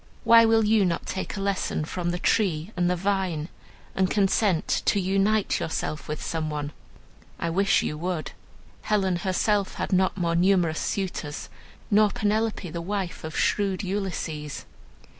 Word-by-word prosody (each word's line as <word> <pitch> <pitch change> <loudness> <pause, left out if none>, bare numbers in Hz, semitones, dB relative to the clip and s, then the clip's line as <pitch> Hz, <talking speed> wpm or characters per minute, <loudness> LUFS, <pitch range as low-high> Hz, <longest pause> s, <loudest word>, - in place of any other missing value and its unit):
Why 230 0 +7
will 225 -1 +4
you 215 -1 +4
not 175 -2 -1
take 190 +2 -4
a - - -3
lesson 195 -5 -1
from 175 +2 -3
the 175 - -1
tree 180 -3 +1
and 175 -1 +1
the 180 - +2
vine, 185 -4 -1 0.4
and 190 -1 +1
consent 195 -3 +2
to 205 - +3
unite 195 +3 +1
yourself 155 -1 -3
with 150 0 -4
some 160 -1 -2
one? 150 -1 -3 0.7
I 170 - -2
wish 195 +3 +3
you 150 - -3
would. 175 -2 -3 0.5
Helen 190 -4 +1
herself 195 +3 0
had - - -3
not 185 +1 +2
more 170 -2 0
numerous 175 -2 +3
suitors, 175 -7 -3 0.4
nor 210 0 +5
Penelope, 215 -1 -1
the 170 - -4
wife 190 0 -3
of 160 0 -5
shrewd 200 -1 +1
Ulysses. 175 -6 -4
185 Hz, 155 wpm, -26 LUFS, 170-200 Hz, 0.7 s, Why